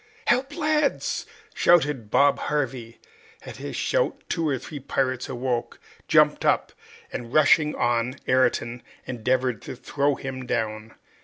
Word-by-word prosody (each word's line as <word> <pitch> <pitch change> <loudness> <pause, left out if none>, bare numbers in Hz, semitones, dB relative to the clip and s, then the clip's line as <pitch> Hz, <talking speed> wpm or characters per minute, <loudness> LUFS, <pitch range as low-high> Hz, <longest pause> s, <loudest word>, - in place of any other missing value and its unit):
"Help, 265 +4 +1
lads!" 305 -3 0 0.3
shouted 145 -10 +3
Bob 140 +5 +4
Harvey. 130 -5 -3 0.5
At - - -9
his - - -6
shout - - 0
two 165 -3 0
or 135 - 0
three 145 +3 -8
pirates 130 -2 -1
awoke, 125 -1 -3 0.3
jumped - - +4
up, - - +2 0.4
and, 120 -1 -5
rushing 150 +1 +4
on 120 +1 0
Ayrton, 125 -2 +1 0.2
endeavored 125 -1 -1
to - - -7
throw 140 +3 0
him 130 -2 -6
down. 110 -2 -3
130 Hz, 130 wpm, -25 LUFS, 120-150 Hz, 0.5 s, Bob